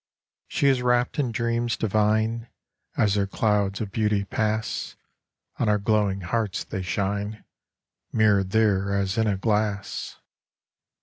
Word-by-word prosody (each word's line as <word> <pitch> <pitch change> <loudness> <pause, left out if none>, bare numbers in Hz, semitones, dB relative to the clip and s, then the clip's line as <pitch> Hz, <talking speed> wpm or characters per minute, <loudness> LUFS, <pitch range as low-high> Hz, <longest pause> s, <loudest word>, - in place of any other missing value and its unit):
She - - -1
is 135 -2 +4
rapt 125 +2 +1
in 130 -5 +1
dreams 115 0 -1
divine: 110 +2 +1 0.5
As 105 -3 +3
her 100 -1 +1
clouds 100 -1 0
of 105 -3 -4
beauty 105 -2 +1
pass, 110 +2 -2 0.6
On 110 - +2
our 105 - +4
glowing 100 -2 +1
hearts 105 +2 -1
they 95 - -5
shine, 100 +3 -2 0.7
Mirrored 100 -3 +3
there 100 -2 +2
as 100 +1 0
in 110 - +2
a 100 -2 +1
glass. 105 -1 -1
105 Hz, 130 wpm, -25 LUFS, 100-110 Hz, 0.7 s, is